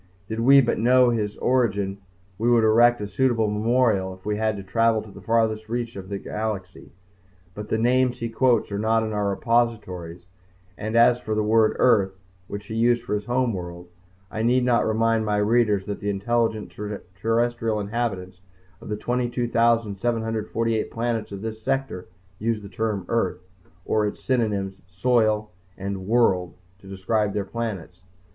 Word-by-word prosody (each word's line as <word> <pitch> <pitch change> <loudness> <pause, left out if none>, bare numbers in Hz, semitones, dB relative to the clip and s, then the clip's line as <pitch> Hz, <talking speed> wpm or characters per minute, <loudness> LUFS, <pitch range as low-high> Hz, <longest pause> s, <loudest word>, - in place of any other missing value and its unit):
Did 110 +2 -4
we 135 +4 +7
but 120 - 0
know 125 +1 +5
his 105 -3 -2
origin 100 -6 0 0.4
we 115 +2 +2
would 120 -2 +4
erect 120 +2 +5
a 105 - -3
suitable 115 -1 +1
memorial 105 -3 +1
if 95 - -23
we 105 0 -1
had 110 -1 0
to 100 - -7
travel 115 +2 +1
to 110 - -13
the - - -12
farthest 110 -1 0
reach 120 0 -3
of 95 0 -9
our 100 - -2
galaxy. 100 -3 -5 0.6
But 105 +1 -8
the - - +1
names 125 +2 +2
he 115 - -3
quotes 115 -1 +1
are 100 - -2
not 110 +1 +2
in 110 -1 -3
our 105 -1 0
repositories 100 -6 -1 0.5
and 110 +3 -4
as 120 +1 +5
for 110 -2 -3
the 110 - +1
word 110 0 +3
"Earth" 100 -6 +3 0.3
which 100 0 -7
he 110 - -7
used 120 +1 +2
for 115 - -4
his 105 0 -2
homeworld, 95 -9 -2 0.4
I 110 - -3
need 125 +2 +2
not 120 -2 +2
remind 115 0 +2
my 105 -1 0
readers 105 -2 +2
that 100 - -5
the 105 - -3
intelligent 110 +2 -1 0.4
terrestrial 115 +1 0
inhabitants 100 -4 -3 0.4
of - - -10
the 105 - -2
22,748 115 -2 0
planets 115 -2 -2
of 100 +1 -7
this 110 0 -5
sector 135 -6 -2 0.3
use 110 -1 -1
the 100 - -9
term 105 -2 -2
"Earth" 115 -7 0 0.5
or 105 -1 +1
its 105 - -7
synonyms 105 -7 -1
"soil" 110 +2 +1 0.3
and 95 -1 -5
"world" 100 -6 +2 0.2
to 95 - -16
describe 100 +2 -1
their 100 -1 -2
planets. 95 -5 -5
110 Hz, 165 wpm, -24 LUFS, 100-115 Hz, 0.6 s, we